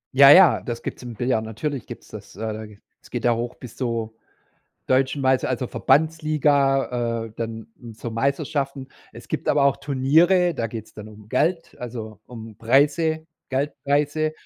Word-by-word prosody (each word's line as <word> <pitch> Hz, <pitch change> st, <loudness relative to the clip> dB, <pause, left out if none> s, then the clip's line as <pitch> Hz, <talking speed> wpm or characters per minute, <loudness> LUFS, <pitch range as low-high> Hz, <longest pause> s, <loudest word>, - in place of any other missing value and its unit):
Ja, 140 Hz, +1 st, +9 dB
ja, 180 Hz, +3 st, +8 dB
das 120 Hz, -1 st, -6 dB
gibt's -, -, -6 dB
im 120 Hz, -2 st, -8 dB
Billard, 120 Hz, -1 st, 0 dB
natürlich 120 Hz, +4 st, -4 dB
gibt's -, -, -10 dB
das, -, -, -11 dB
äh, -, -, -13 dB
da 110 Hz, +1 st, -7 dB, 0.4 s
es -, -, -18 dB
geht 120 Hz, -2 st, -4 dB
ja 120 Hz, -, +4 dB
hoch 120 Hz, +1 st, -4 dB
bis 125 Hz, -4 st, -11 dB
zur 115 Hz, -3 st, -2 dB, 0.8 s
Deutschen 135 Hz, +2 st, +2 dB
Meister 130 Hz, -1 st, +2 dB
also 125 Hz, -1 st, -2 dB
Verbandsliga, 140 Hz, -6 st, +1 dB
äh, -, -, -17 dB
dann 115 Hz, -1 st, -5 dB, 0.3 s
zur 115 Hz, +2 st, -6 dB
Meisterschaften. 140 Hz, +2 st, -2 dB, 0.2 s
Es -, -, -13 dB
gibt -, -, -3 dB
aber 145 Hz, -, +3 dB
auch 140 Hz, -, +3 dB
Turniere, 165 Hz, +7 st, +3 dB
da 115 Hz, -, -2 dB
geht's 110 Hz, -1 st, -8 dB
dann 105 Hz, -1 st, -9 dB
um 105 Hz, -1 st, -14 dB
Geld, 165 Hz, +8 st, 0 dB
also, 115 Hz, -4 st, -7 dB
um 115 Hz, -3 st, -10 dB
Preise, 150 Hz, +7 st, +2 dB, 0.3 s
Geldpreise 145 Hz, +2 st, 0 dB
130 Hz, 160 wpm, -23 LUFS, 115-145 Hz, 0.8 s, Ja